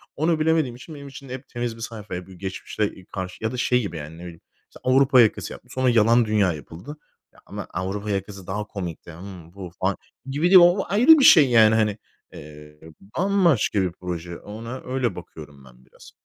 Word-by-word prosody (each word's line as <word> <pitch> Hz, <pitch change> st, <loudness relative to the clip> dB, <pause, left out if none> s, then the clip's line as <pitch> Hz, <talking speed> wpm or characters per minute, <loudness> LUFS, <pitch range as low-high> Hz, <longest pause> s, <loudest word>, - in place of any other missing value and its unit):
Onu 160 Hz, +2 st, +1 dB
bilemediğim 155 Hz, -6 st, +1 dB
için, 150 Hz, +6 st, -11 dB
benim 140 Hz, -1 st, -10 dB
için 135 Hz, 0 st, -11 dB
hep 130 Hz, +1 st, -8 dB
temiz 120 Hz, -1 st, -4 dB
bir 115 Hz, -, -13 dB
sayfa, 110 Hz, -4 st, -7 dB
ya, 90 Hz, 0 st, -7 dB
bir 95 Hz, -, -13 dB
geçmişle 95 Hz, +1 st, -5 dB
karşı 95 Hz, +1 st, -7 dB
ya 110 Hz, -, -1 dB
da 125 Hz, -, -5 dB
şey 125 Hz, 0 st, +2 dB
gibi, 85 Hz, -7 st, -5 dB
yani, 75 Hz, +1 st, -8 dB
ne -, -, -12 dB
bileyim, 85 Hz, -2 st, -10 dB, 0.3 s
mesela, 130 Hz, 0 st, -2 dB
Avrupa 135 Hz, -2 st, +6 dB
Yakası 110 Hz, -, 0 dB
yapmas 125 Hz, -, -14 dB
Sonra 130 Hz, -1 st, +1 dB
Yalan 115 Hz, +1 st, +4 dB
Dünya 105 Hz, -5 st, +2 dB
yapıldı. 80 Hz, -, -10 dB, 0.4 s
Ya, -, -, -21 dB
ama -, -, -8 dB
Avrupa 95 Hz, +3 st, -4 dB
Yakası 100 Hz, -1 st, -4 dB
daha 105 Hz, +3 st, -3 dB
komikti. 90 Hz, -4 st, -7 dB
Hımm, 90 Hz, 0 st, -11 dB
bu 95 Hz, -3 st, -9 dB
falan, 95 Hz, +1 st, 0 dB, 0.3 s
gibi 145 Hz, +5 st, 0 dB
değil. 190 Hz, -, +9 dB
O 175 Hz, +3 st, +4 dB
ayrı 255 Hz, +10 st, +6 dB
bir -, -, +3 dB
şey 150 Hz, -7 st, +8 dB
yani, 110 Hz, -2 st, +5 dB
hani. 105 Hz, -1 st, +1 dB, 0.4 s
Eee, 75 Hz, 0 st, -13 dB, 0.4 s
bambaşka 175 Hz, -, +2 dB
bir 90 Hz, -2 st, -1 dB
proje, 85 Hz, -1 st, -6 dB
ona 115 Hz, +5 st, -8 dB
öyle 125 Hz, -6 st, -2 dB
bakıyorum 75 Hz, -5 st, -12 dB
ben 60 Hz, 0 st, -19 dB
biraz. -, -, -17 dB
105 Hz, 200 wpm, -23 LUFS, 90-130 Hz, 0.4 s, değil